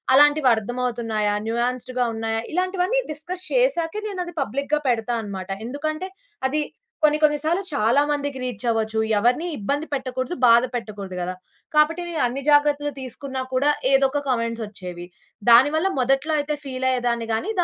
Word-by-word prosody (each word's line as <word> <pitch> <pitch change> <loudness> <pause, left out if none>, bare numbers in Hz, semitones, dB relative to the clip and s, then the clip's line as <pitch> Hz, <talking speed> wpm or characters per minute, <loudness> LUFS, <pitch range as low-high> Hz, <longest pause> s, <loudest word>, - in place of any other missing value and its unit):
అలాంటివి 290 -1 +6
అర్థం 245 +4 -4
అవుతున్నాయా, 220 -4 0
న్యూయాస్ద్‌గా 250 +1 -1
ఉన్నాయా? 225 0 -1
ఇలాంటివన్నీ 370 +6 +1
డిస్కస్ 350 +5 -7
చేసాకే 425 -7 +1
నేనది 360 -4 -5
పబ్లిక్‌గా 280 +5 -1
పెడతానన్నమాట. 220 -5 -2 0.2
ఎందుకంటే, 310 +7 -3 0.4
అది 300 +3 0 0.4
కొన్ని 300 0 +5
కొన్ని 295 -1 +4
సార్లు 345 +5 +1
చాలా 255 +1 +3
మందికి 285 -2 -1
రీచ్ 245 -3 -4
అవ్వచ్చు. 220 -1 0 0.2
ఎవరిని 250 +11 +2
ఇబ్బంది 280 +8 -2
పెట్టకూడదు, 260 +2 -2
బాధ 235 +1 +7
పెట్టకూడదు 205 -5 -5
గదా! 180 +1 -2 0.4
కాబట్టి 320 +3 +4
నేను 330 -2 -2
అన్ని 255 +3 -2
జాగ్రత్తలు 290 0 +3
తీసుకున్నా 260 +1 -5
కూడా, 275 +3 +3 0.2
ఏదో 270 0 +5
ఒక 290 +1 -1
కామెంట్స్ 230 -2 -1
ఒచ్చేవి. 180 -4 -8 0.4
దాని 245 +5 +8
వల్ల 340 +5 +2
మొదట్లో 270 +5 +1
అయితే 295 +1 -1
ఫీల్ 260 -1 -4
అయ్యేదాన్ని 240 -2 0
గాని, 225 - -1
260 Hz, 145 wpm, -23 LUFS, 230-300 Hz, 0.4 s, దాని